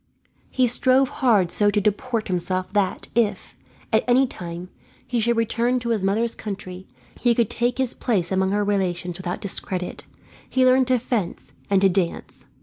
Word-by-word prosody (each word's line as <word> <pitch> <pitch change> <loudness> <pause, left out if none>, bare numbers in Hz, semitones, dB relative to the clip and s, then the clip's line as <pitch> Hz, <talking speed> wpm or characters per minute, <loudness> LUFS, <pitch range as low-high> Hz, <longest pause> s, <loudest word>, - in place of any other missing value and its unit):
He 255 - +2
strove 255 +2 +3
hard 210 -10 +2
so 205 +3 +3
to 205 0 +2
deport 215 +3 -1
himself 185 +1 -2
that 200 -3 0
if, 210 -5 0 0.4
at 220 - +4
any 250 +2 +5
time, 175 -6 -7 0.4
he 245 - -1
should 235 +1 +1
return 235 +2 +1
to 235 -1 -4
his 220 -4 0
mother's 220 +4 +1
country, 190 -3 -7 0.3
he 240 -1 +3
could 230 -3 +1
take 240 +1 0
his 260 -2 0
place 195 -8 -1
among 190 0 +1
her 205 +1 +1
relations 180 -3 -1
without 180 -1 -4
discredit. 185 -2 -2 0.4
He 260 0 +3
learned 255 0 +4
to 255 -1 +3
fence, 230 -6 -3 0.2
and 195 -1 +3
to 195 - +5
dance. 180 -2 -2
210 Hz, 170 wpm, -23 LUFS, 185-240 Hz, 0.4 s, any